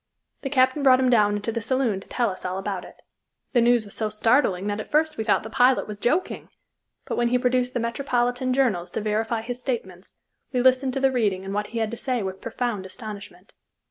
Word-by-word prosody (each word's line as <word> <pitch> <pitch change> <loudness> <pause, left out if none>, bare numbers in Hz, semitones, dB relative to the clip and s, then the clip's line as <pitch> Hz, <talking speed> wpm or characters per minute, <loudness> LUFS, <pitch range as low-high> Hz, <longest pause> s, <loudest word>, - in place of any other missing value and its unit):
The 270 - -3
captain 260 +1 +3
brought 260 -2 +6
him 255 -1 +2
down 210 -3 +4
into 205 +2 -3
the 230 0 -3
saloon 235 -4 0
to - - -15
tell 240 -4 0
us 185 - -7
all 185 0 -3
about 195 -2 -3
it. - - -16 0.5
The 240 - +4
news 240 -1 +3
was 205 - -6
so 215 -1 -1
startling 215 -3 +2
that 205 0 -2
at 215 - -7
first 310 +1 +2
we 220 - -3
thought 215 - +2
the 220 - -7
pilot 255 0 +3
was 210 -1 -7
joking, 310 +12 -1 0.6
but - - -3
when 240 - +2
he 250 +1 +2
produced 250 0 0
the - - +1
metropolitan 245 +1 -1
journals 235 -10 +1
to - - -2
verify 220 +2 -1
his 245 +1 -5
statements, 190 -8 -5 0.4
we 250 - 0
listened 260 +1 +3
to 270 - -1
the 270 0 +3
reading 205 -7 0
and 195 - -4
what 210 0 -1
he 235 - -7
had 220 -1 -1
to 235 - -5
say 250 -4 -1
with 190 0 -5
profound 230 -3 -3
astonishment. 205 -3 -9
235 Hz, 230 wpm, -24 LUFS, 205-255 Hz, 0.6 s, brought